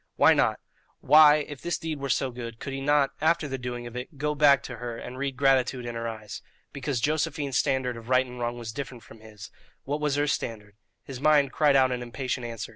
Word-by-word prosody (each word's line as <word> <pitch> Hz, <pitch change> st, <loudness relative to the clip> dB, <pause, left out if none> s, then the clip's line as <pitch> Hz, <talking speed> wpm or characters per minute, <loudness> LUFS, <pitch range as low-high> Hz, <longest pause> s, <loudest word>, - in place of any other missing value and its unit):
Why -, -, +6 dB
not? -, -, +1 dB, 0.4 s
Why, 150 Hz, -1 st, +7 dB
if 145 Hz, -3 st, -9 dB
this 175 Hz, -3 st, -2 dB
deed 160 Hz, -3 st, -5 dB
were 140 Hz, 0 st, -4 dB
so 130 Hz, +1 st, 0 dB
good, 120 Hz, -1 st, -7 dB
could 140 Hz, -, -6 dB
he 135 Hz, -, -4 dB
not, 140 Hz, -1 st, +2 dB
after 160 Hz, -1 st, +2 dB
the 135 Hz, -1 st, -4 dB
doing 120 Hz, -1 st, -5 dB
of 120 Hz, 0 st, -9 dB
it, 125 Hz, +5 st, -7 dB
go 150 Hz, +1 st, -1 dB
back 140 Hz, -2 st, +5 dB
to 125 Hz, -, -7 dB
her 120 Hz, -1 st, -6 dB
and 125 Hz, -, -8 dB
read 135 Hz, 0 st, -3 dB
gratitude 130 Hz, -2 st, +2 dB
in 120 Hz, -, -4 dB
her 115 Hz, 0 st, -4 dB
eyes? 110 Hz, -3 st, -7 dB, 0.3 s
Because 140 Hz, -2 st, -2 dB
Josephine's 145 Hz, -1 st, 0 dB
standard 130 Hz, -2 st, 0 dB
of 115 Hz, +1 st, -11 dB
right 130 Hz, 0 st, +4 dB
and 125 Hz, -1 st, -10 dB
wrong 120 Hz, 0 st, -2 dB
was 115 Hz, -2 st, -6 dB
different 125 Hz, -1 st, -7 dB
from 110 Hz, +1 st, -15 dB
his. 110 Hz, 0 st, -12 dB, 0.3 s
What 145 Hz, +2 st, -3 dB
was 150 Hz, -2 st, 0 dB
her 145 Hz, 0 st, +1 dB
standard? 105 Hz, -7 st, -4 dB, 0.3 s
His 135 Hz, -2 st, -8 dB
mind 145 Hz, -2 st, +4 dB
cried 150 Hz, -2 st, +3 dB
out 130 Hz, -1 st, +4 dB
an 125 Hz, -1 st, -2 dB
impatient 125 Hz, +1 st, -4 dB
answer. 115 Hz, -1 st, -6 dB
130 Hz, 230 wpm, -26 LUFS, 120-145 Hz, 0.4 s, Why